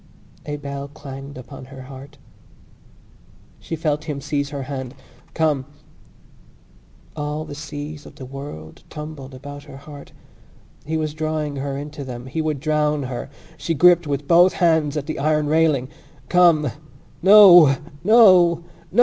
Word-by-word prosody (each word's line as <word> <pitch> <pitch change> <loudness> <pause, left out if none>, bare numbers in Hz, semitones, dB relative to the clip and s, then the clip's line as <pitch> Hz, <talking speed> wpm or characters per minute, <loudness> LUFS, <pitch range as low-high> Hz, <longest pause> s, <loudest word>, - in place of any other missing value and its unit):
A 145 - -3
bell 140 -1 -6
clanged 140 -1 -10
upon 130 +1 -10
her 130 0 -11
heart. 135 +2 -12 1.4
She 165 - -5
felt 150 -1 -2
him 150 -3 -4
seize 145 0 -2
her 140 -2 -5
hand: 130 -1 -6 0.4
"Come!" 150 -5 0 1.5
All 150 +1 -4
the - - -8
seas 150 0 -8
of - - -15
the 135 -4 -9
world 130 - -9
tumbled 150 -3 -8
about 145 +2 -10
her 135 - -11
heart. 140 0 -12 0.8
He 160 +1 -1
was 155 -1 -2
drawing 155 -2 -3
her 135 0 -4
into 145 0 -7
them: 125 -2 -8
he 130 +5 -3
would 155 -3 -2
drown 150 0 0
her. 130 +1 -6 0.3
She 165 - -2
gripped 175 +1 +5
with 140 0 -3
both 175 +2 +5
hands 160 -4 +1
at 145 - -3
the 155 - -5
iron 150 +1 +1
railing. 155 -4 +2 0.4
"Come!" 170 -6 +4 0.5
No! 175 -7 +8 0.3
No! 185 -6 +6 0.3
No! 205 - 0
150 Hz, 145 wpm, -21 LUFS, 140-155 Hz, 1.5 s, No